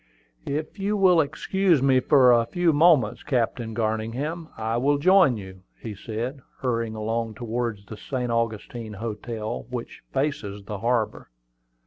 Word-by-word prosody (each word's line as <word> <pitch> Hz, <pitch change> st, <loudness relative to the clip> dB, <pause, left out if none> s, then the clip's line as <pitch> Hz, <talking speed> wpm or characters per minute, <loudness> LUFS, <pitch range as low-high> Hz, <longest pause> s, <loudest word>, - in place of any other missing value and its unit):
"If 155 Hz, +7 st, -4 dB
you 205 Hz, +2 st, 0 dB
will 180 Hz, -4 st, +5 dB
excuse 165 Hz, +1 st, +1 dB
me 135 Hz, -1 st, +5 dB
for 130 Hz, -1 st, +5 dB
a 115 Hz, -1 st, +3 dB
few 175 Hz, +3 st, +2 dB
moments, 145 Hz, -8 st, +4 dB
Captain 120 Hz, -4 st, -1 dB
Garningham, 115 Hz, +9 st, -2 dB
I 110 Hz, +1 st, -1 dB
will 140 Hz, +4 st, +2 dB
join 180 Hz, -, +5 dB
you," 95 Hz, -2 st, -10 dB, 0.2 s
said 115 Hz, +4 st, -4 dB
he, -, -, -18 dB, 0.2 s
hurrying 115 Hz, -3 st, -1 dB
along 110 Hz, +1 st, -2 dB
towards 115 Hz, -2 st, -3 dB
the 110 Hz, -, -9 dB
St. 125 Hz, +1 st, -3 dB
Augustine 115 Hz, -1 st, -2 dB
Hotel, 110 Hz, -, -5 dB
which -, -, -6 dB
faces 105 Hz, -8 st, -2 dB
the 100 Hz, 0 st, -6 dB
harbor. 115 Hz, 0 st, -1 dB
120 Hz, 140 wpm, -25 LUFS, 110-145 Hz, 0.2 s, will